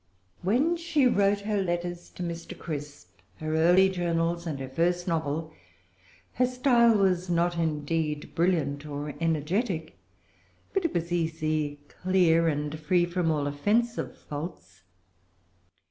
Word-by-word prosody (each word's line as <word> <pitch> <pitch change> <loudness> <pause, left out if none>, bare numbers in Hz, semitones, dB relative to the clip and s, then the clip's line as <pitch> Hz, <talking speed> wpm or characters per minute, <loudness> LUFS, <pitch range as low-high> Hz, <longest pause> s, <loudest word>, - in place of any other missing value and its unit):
When 265 - +2
she 330 -5 +1
wrote 200 -4 +3
her 205 -1 0
letters 175 -1 -3
to 180 - -6
Mr. 170 -1 -6
Crisp, 145 - -7 0.2
her 155 0 -3
early 175 +4 +5
journals, 170 -2 -1
and 145 -4 -3
her 135 - -5
first 175 +6 0
novel, 160 -1 -2 0.8
her 250 +1 +2
style 245 -3 +4
was 185 -2 +1
not 175 0 +2
indeed 155 -1 -1
brilliant 160 -5 +1
or 145 0 -5
energetic; 165 - -1 0.7
but 390 -3 0
it 335 - -1
was 170 0 -1
easy, 155 -3 -1
clear, 175 -2 +2
and 150 0 -2
free 175 +3 +2
from 175 -1 -1
all 150 -2 +1
offensive 210 +12 0
faults. 145 - -8
170 Hz, 130 wpm, -27 LUFS, 155-190 Hz, 0.8 s, early